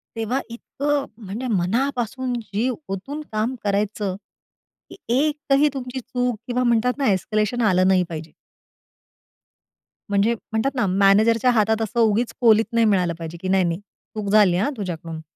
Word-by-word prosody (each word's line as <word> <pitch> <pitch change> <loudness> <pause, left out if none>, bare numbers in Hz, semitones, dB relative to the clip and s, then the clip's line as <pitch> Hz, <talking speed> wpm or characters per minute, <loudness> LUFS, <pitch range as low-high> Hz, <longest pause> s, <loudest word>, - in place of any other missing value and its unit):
तेव्हा 225 +4 -1
इतकं 280 +4 -2 0.2
म्हणजे 225 +7 -4
मनापासून 245 +5 -1
जीव 225 +4 -2 0.2
ओतून 280 +11 -5
काम 220 +4 -1
करायचं, 200 -1 -1 0.7
की - - -11 0.2
एकही 295 -1 +2
तुमची 260 -1 -5
चूक 245 -2 -2
किंवा 250 +1 0
म्हणतात 240 +1 +2
ना 275 -6 +1
एस्केलेशन 215 +5 0
आलं 185 0 +3
नाही 185 -1 +4
पाहिजे. 160 -1 -7 1.8
म्हणजे 205 +3 +2 0.2
म्हणतात 245 +5 0
ना 245 - +1
मॅनेजरच्या 210 +6 +4
हातात 220 0 +2
असं 225 +2 -2
उगीच 225 +1 +2
कोलीत 225 -1 +5
नाही 230 -1 +3
मिळालं 180 -5 +2
पाहिजे, 165 +1 -7
की 185 - -4
नाही 190 0 +3
नाही 170 +1 -1
चूक 205 0 -9
झाली 200 -5 +5
हां 250 +10 0
तुझ्याकडून. 165 -4 -5
220 Hz, 145 wpm, -22 LUFS, 195-250 Hz, 1.8 s, कोलीत